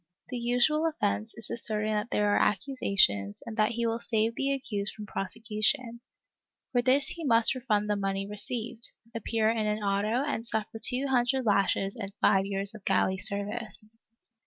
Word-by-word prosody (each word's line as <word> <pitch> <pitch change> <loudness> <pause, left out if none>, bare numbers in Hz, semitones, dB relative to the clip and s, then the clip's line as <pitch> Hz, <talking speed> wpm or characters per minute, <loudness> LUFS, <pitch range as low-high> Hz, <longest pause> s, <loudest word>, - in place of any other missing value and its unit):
The 250 - -4
usual 245 +7 +2
offence 105 - -2
is 230 - -8
assert 215 -2 -1
ing 215 - 0
that 210 +2 -1
there 210 0 +1
are 205 - +3
accusations 195 - +1
and 230 - -6
that 215 +2 +2
he 235 0 -1
will 230 0 0
save 225 -1 0
the 275 +3 -1
accused 210 -7 -1
from 210 - -8
prosecution; 225 +5 -2 0.7
for 245 - +2
this 265 +3 +3
he 335 - -5
must 230 -5 +5
refund 220 -5 0
the 210 - +1
money 195 0 -2
received, 225 +3 -3 0.2
appear 225 0 0
in 220 -2 -1
an 210 0 -1
auto 205 +5 +1
and 230 -6 -2
suffer 220 -1 -3
two 260 +1 +4
hundred 260 0 +1
lashes 195 -1 +1
and 200 -4 -6
five 195 0 +3
years 195 +1 0
of 215 -3 -12
galley 190 0 +1
service. 215 +2 -1
220 Hz, 175 wpm, -28 LUFS, 205-240 Hz, 0.7 s, must